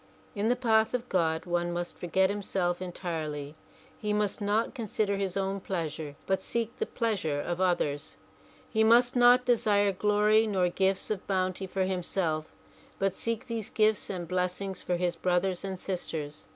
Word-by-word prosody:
In 210 +2 0
the 245 - +3
path 225 -2 +2
of 250 0 -3
God 160 -2 +1
one 175 0 0
must 175 0 -4
forget 190 +2 +1
himself 185 -3 -1
entirely. 155 -5 -4 0.5
He 210 -1 -1
must 210 0 0
not 210 +3 +1
consider 215 -4 -1
his 195 -1 -2
own 195 0 -1
pleasure 160 -6 -4
but 190 -1 0
seek 235 +3 -2
the 445 - -1
pleas 225 -5 -1
ure 145 -2 0
of 175 +4 -3
others. 155 -5 0 0.5
He 220 -1 +2
must 240 +3 +5
not 245 +1 +6
desire 210 -4 +3
glory 210 +3 +3
nor 185 -4 +2
gifts 190 +3 0
of 205 -3 -3
bounty 185 0 -1
for 190 +1 -1
himself 175 -4 -1 0.5
but 195 -1 +1
seek 230 +4 -2
these 230 -4 -4
gifts 215 -1 +2
and 180 -3 -4
blessings 185 +2 -2
for 180 - -1
his 175 0 0
brothers 180 +2 0
and 190 -2 -4
sisters. 160 -6 -5
190 Hz, 165 wpm, -29 LUFS, 175-215 Hz, 0.5 s, not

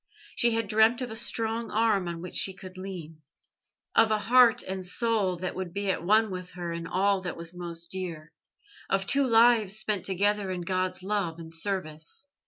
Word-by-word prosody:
She 235 -1 +3
had 225 -2 -1
dreamt 220 +4 +4
of 245 - -5
a - - -4
strong 230 0 -1
arm 215 -4 +2
on 170 -1 -5
which 180 - -7
she 190 - +1
could 185 -1 -10
lean, 175 -5 -8 0.7
of 225 - +5
a 215 - +2
heart 235 +2 +5
and 190 0 -4
soul 200 0 +1
that 180 +1 -4
would 185 -1 -6
be 200 -1 0
at 170 - -3
one 215 +3 +3
with 180 -1 -6
her 175 -1 -5
in 170 0 -5
all 195 +2 +1
that 180 -1 -5
was 170 +1 -6
most 170 -1 -7
dear, 170 -4 -5 0.6
of 195 0 +1
two 275 +7 +3
lives 225 -3 +4
spent 215 -3 -1
together 200 +1 +1
in 180 -1 -3
God's 185 +1 -2
love 190 -5 -1
and 165 -1 -8
service. 165 - -4
190 Hz, 190 wpm, -28 LUFS, 175-220 Hz, 0.7 s, of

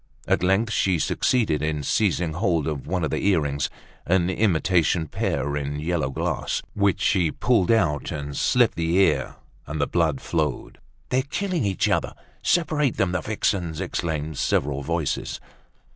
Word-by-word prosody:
At - - +2
length 95 +5 +2
she 95 -3 +2
succeeded 85 - +1
in 75 -1 -1
seizing 90 -1 +1
hold 85 -4 0
of 75 -4 -4
one 90 +1 -1
of 75 - -1
the - - -2
earrings—an 85 +2 0
imitation 85 -4 +2
pear 70 0 -1
in 75 0 -3
yellow 80 -3 -1
glass—which 100 +7 -1
she 90 -6 +2
pulled 110 0 +1
out 75 - +2
and 70 -1 -5
slit - - +3
the 85 +1 0
ear, 95 - +2 0.3
and 75 +2 -4
the 70 - +2
blood 80 -5 +1
flowed. 75 -5 -2 0.3
"They're 130 - +2
killing 170 - -2
each 95 -3 +1
other! - - 0 0.3
Separate 155 -6 +1
them, 95 -2 +1
the 90 -1 -1
vixens!" 90 -5 -1
exclaimed 80 -5 -3
several 70 0 0
voices. 80 +1 -2
85 Hz, 145 wpm, -24 LUFS, 75-100 Hz, 0.3 s, slit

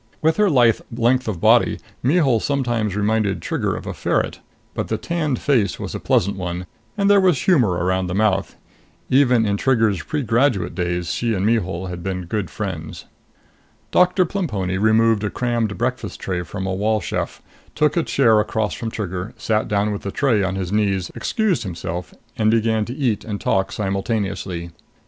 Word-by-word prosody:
With 160 +1 +2
her 210 -1 +4
lithe 120 - +4
length 120 +2 +1
of 100 -6 -2
body, - - +4 0.2
Mihul 135 -4 +3
sometimes 120 -7 -1
reminded 105 -1 +1
Trigger - - -2
of - - -7
a - - -4
ferret, - - -1 0.3
but - - -3
the - - -1
tanned 155 -6 -1
face 115 - +1
was - - -5
a - - -4
pleasant 100 +2 +1
one 90 -1 -4 0.3
and 200 -1 +2
there 200 -1 +6
was 180 -8 +2
humor 130 - +3
around 90 +1 0
the 90 - -3
mouth. 105 -2 +1 0.6
Even 125 -4 +4
in 100 -1 0
Trigger's 110 -7 +2
pregraduate 120 - 0
days, 90 -1 -2
she 115 -2 0
and 95 +1 -1
Mihul 95 -5 0
had 90 -1 -6
been 90 0 -3
good 100 0 -3
friends. 90 -7 -5 0.9
Doctor 180 +1 +4
Plemponi 105 - -2
removed 110 0 +3
a 105 - 0
crammed 120 -4 -1
breakfast 120 -3 -3
tray 90 -2 -2
from 95 +2 -5
a 95 - -1
wall 105 +3 +1
chef, 95 - -4 0.3
took 150 -1 +2
a 170 - +3
chair 115 -8 +3
across 105 0 -1
from 115 - -4
Trigger, 95 -1 -5
sat 110 -1 0
down 105 +1 +1
with 100 - -4
the 100 - -4
tray 120 -5 +2
on 95 0 -1
his 95 -2 -3
knees, 100 -4 0
excused 215 -6 0
himself, 90 -2 -5 0.2
and 110 -1 +2
began 110 -1 +2
to 120 - -5
eat 125 -8 0
and 105 -2 -4
talk 95 0 0
simultaneously. 95 -4 -2
110 Hz, 175 wpm, -21 LUFS, 95-125 Hz, 0.9 s, there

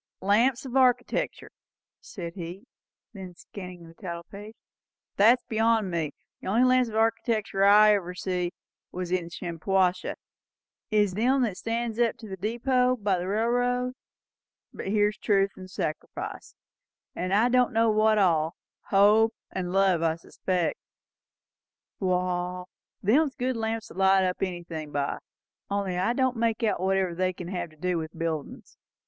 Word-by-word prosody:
"'Lamps 230 +7 +2
of 260 - -6
Architectur'," 255 -2 +1 0.5
said 170 -3 -8
he, 180 +4 -8 0.5
looking 185 -3 -9 0.2
then 185 -3 -7 0.2
at - - -21
the - - -24
title 170 -3 -5
page; 205 +5 -11 0.6
"that's 235 +5 +5
beyond 225 -3 +1
me. 165 -3 -1 0.3
The - - -8
only 225 +6 +3
lamps 255 -1 +4
of 215 - -7
architectur 220 -2 0
that 200 - +6
I 210 +1 +7
ever 180 -3 -2
see, 180 -1 -2 0.4
in 180 -1 -2
Shampuashuh 180 +2 0
anyway, - - -3 0.7
is 210 -4 +2
them 255 +6 +2
that 215 -6 -1
stands 230 +2 -3
up 235 -2 +2
at - - -35
the 215 -5 -8
depot, 250 +5 +1
by 200 -5 0
the 180 - -4
railroad; 245 +4 0 0.8
but - - -7
here's 210 +1 +1
'truth,' 200 -2 +2
and 185 0 -10
'sacrifice,' 155 -4 -5 0.6
and 185 +1 -3
I 210 +5 +4
don' 250 0 +3
know 225 -1 +3
what 215 0 +3
all; 165 -5 +2 0.3
'hope' 210 +3 +4 0.2
and 180 -1 -3
'love,' 190 -3 +3
I 165 -1 +2
expect. 175 +1 -2 1.2
Wall, 180 -1 -1 0.4
them's 275 +8 +3
good 255 0 -1
lamps 225 0 -3
to - - -11
light 190 0 +4
up 180 -1 -1
anythin' 170 -5 -4
by; 140 -1 -2 0.5
only 200 -2 -1
I 185 +6 +1
don't 260 -1 +1
make 230 0 0
out 215 - +1
whatever 190 -1 +1
they 185 +1 0
kin 175 -1 -8
have 175 -2 -3
to 155 - -20
do 180 +1 -1
with 160 +1 -7
buildin's." 160 -3 -5
195 Hz, 155 wpm, -27 LUFS, 180-225 Hz, 1.2 s, I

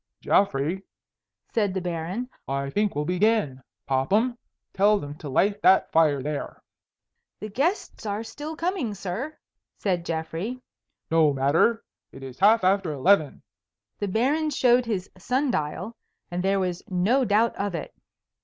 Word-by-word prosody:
"Geoffrey," 180 -1 +1 0.7
said 205 -4 +1
the - - +1
Baron, 180 +6 -3 0.2
"I 140 0 -2
think 205 0 0
we'll 150 0 -1
begin. 180 - +1 0.2
Popham, 200 - +1 0.4
tell 205 +2 +4
them 145 -6 -6
to 150 - -7
light 200 +9 +1
that 190 - +4
fire 150 -5 +3
there." 150 0 -5 0.8
"The 215 - -6
guests 295 - -1
are 205 +2 -2
still 295 +7 -7
coming, 330 - -2
sir," 210 - -5 0.4
said 180 -4 -1
Geoffrey. 165 +9 -4 0.5
"No 160 -3 +4
matter. 145 - +2 0.3
It 135 - -11
is 130 -1 -9
half 215 +2 +5
after 190 -2 +2
eleven." 150 +2 +2 0.6
The 205 - -1
Baron 275 +10 +1
showed 250 -3 +3
his 195 -5 -2
sun 260 +7 0
dial, 180 +6 -3 0.4
and 175 +1 -2
there 195 0 +2
was 180 -2 -2
no 200 +9 +2
doubt 225 +1 +2
of 200 -2 -2
it. 165 - -6
195 Hz, 145 wpm, -25 LUFS, 160-230 Hz, 0.8 s, half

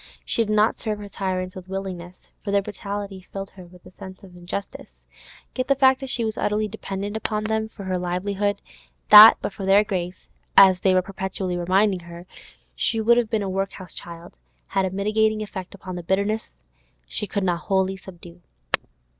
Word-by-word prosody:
She 230 - +1
did 215 - -4
not 215 +1 +3
serve 215 -2 -3
her 205 0 -8
tyrants 185 -2 -3
with 185 -1 -9
willingness, 185 -2 -7
for 205 - -5
their 200 0 +2
brutality 200 -1 -6
filled 195 0 -6
her 185 -2 -13
with 180 0 -18
a - - -13
sense 190 +1 -11
of 185 -2 -14
injustice; 180 +3 -7 0.6
yet 255 0 -2
the 275 - +3
fact 265 -1 +4
that 270 -1 -6
she 235 -3 +1
was 220 -1 -3
utterly 215 +1 0
dependent 205 -1 -5
upon 215 -1 -2
them 220 0 -1
for 200 - -10
her 185 -1 -2
livelihood, 200 +3 -2 0.5
that 210 +1 +11
but - - -3
for 195 - -7
their 195 +2 +5
grace—as 185 0 +2
they 185 0 +3
were 185 - +3
perpetually 190 -1 -4
reminding 185 +2 +2
her—she 170 +6 -6
would 235 +2 +4
have 235 -3 +1
been 220 -2 0
a - - -3
workhouse 190 -2 -4
child, 170 0 -10 0.4
had 195 - +1
a - - -1
mitigating 215 +3 +1
effect 190 -2 -8
upon 185 -2 -8
the 175 - -5
bitterness 200 - -1 0.5
she 210 - -3
could 200 0 -2
not 175 -2 0
wholly 190 0 +1
subdue. 175 - -13
195 Hz, 185 wpm, -23 LUFS, 185-210 Hz, 0.6 s, that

